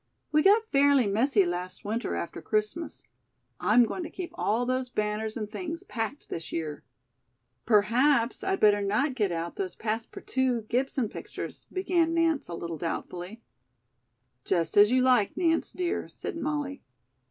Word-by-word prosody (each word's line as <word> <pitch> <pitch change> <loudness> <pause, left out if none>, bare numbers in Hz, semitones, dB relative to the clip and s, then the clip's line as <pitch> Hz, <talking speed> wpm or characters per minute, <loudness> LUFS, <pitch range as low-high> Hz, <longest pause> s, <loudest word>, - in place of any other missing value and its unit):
We 305 0 +4
got 430 +5 +4
fairly 280 -2 +5
messy 210 +1 +3
last 180 +2 -4
winter 225 +3 -2
after 170 - -5
Christmas. 215 - -2 0.6
I'm 235 +3 +5
going 360 - -4
to 325 - -5
keep 355 -1 -6
all 240 -7 0
those 255 0 -1
banners 215 0 -2
and 215 -2 -3
things 330 - -5
packed 250 - -4
this 165 - -6
year." 155 -2 -4 0.8
"Perhaps 235 +4 +3
I'd 385 0 0
better 205 -1 +5
not 215 +8 +1
get 210 -7 0
out 170 0 -4
those 185 -2 -3
passe 225 +1 -3
partouted 250 -4 -1
Gibson 260 -1 0
pictures," - - -8
began 345 -3 +1
Nance 330 -3 +2
a 170 - -5
little 170 -2 -5
doubtfully. 180 +5 -5 1.0
"Just 170 -2 0
as 205 +1 +7
you 255 +1 +3
like, 250 -6 +3
Nance, 330 -2 +1
dear," 360 -1 -2
said - - -6
Molly. 295 -3 -3
235 Hz, 155 wpm, -28 LUFS, 205-295 Hz, 1.0 s, as